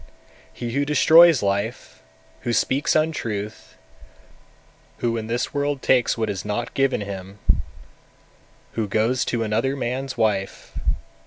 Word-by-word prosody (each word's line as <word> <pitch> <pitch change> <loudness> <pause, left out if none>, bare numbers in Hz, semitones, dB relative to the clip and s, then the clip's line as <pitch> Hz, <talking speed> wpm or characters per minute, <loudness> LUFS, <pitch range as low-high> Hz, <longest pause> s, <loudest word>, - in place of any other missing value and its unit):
246. - - -19
He 140 - 0
who - - +2
destroys 160 -1 +6
life, 100 +3 -2 0.4
who 120 - -2
speaks 135 +4 +1
untruth, 115 -10 -2 1.2
who 115 -1 -1
in 110 -1 -4
this 120 +6 -2
world 145 -1 -1
takes 125 -2 +3
what 110 -1 0
is 95 - -3
not 105 +3 -3
given 135 -4 +1
him, 100 -1 -7 1.3
who 110 -2 -2
goes 115 +5 +1
to 120 -2 -1
another 115 +5 0
man's 130 +1 -3
wife; 100 -3 -1
247. - - -2
120 Hz, 135 wpm, -23 LUFS, 105-135 Hz, 1.3 s, destroys